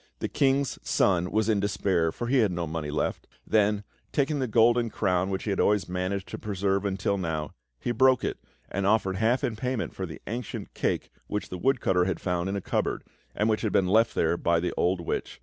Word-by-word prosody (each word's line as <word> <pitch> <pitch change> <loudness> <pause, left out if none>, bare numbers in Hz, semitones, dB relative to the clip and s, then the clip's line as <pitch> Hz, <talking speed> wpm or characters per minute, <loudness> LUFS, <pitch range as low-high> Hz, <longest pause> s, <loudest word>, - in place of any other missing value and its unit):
The - - -2
King's 135 0 +1
Son 90 -2 +2
was 110 +2 +1
in 110 -3 +2
despair, 95 -4 +1
for 120 - -5
he 130 +2 +3
had 110 -5 +3
no 85 -1 -2
money 80 -1 -4
left; 75 - -2 0.2
then 105 -1 +2 0.3
taking 145 +1 +1
the 130 - 0
golden 115 +1 +4
crown 95 -2 0
which 95 -1 -2
he 105 - -1
had 100 - -1
always 105 -1 +2
managed 95 +2 -2
to - - -6
preserve 100 -1 -1
until 100 0 0
now, 80 -4 -2 0.3
he - - -2
broke 130 +1 +4
it - - -2 0.3
and 100 0 0
offered 95 -3 +2
half 115 +5 +2
in 115 - 0
payment 125 -1 -2
for 95 - -4
the 80 - -9
ancient 120 +1 -5
cake - - -1 0.2
which 105 - -3
the 90 - -5
woodcutter 105 -9 +2
had 95 - -1
found 90 0 -1
in 100 - -2
a 100 - -2
cupboard, - - -1 0.3
and 105 - +1
which 110 -1 +1
had 110 - 0
been 95 - +3
left 110 +5 +3
there 80 +1 +2
by 85 -1 +2
the 90 +1 -2
old 90 0 +1
witch. 85 - -4
100 Hz, 220 wpm, -27 LUFS, 90-115 Hz, 0.3 s, golden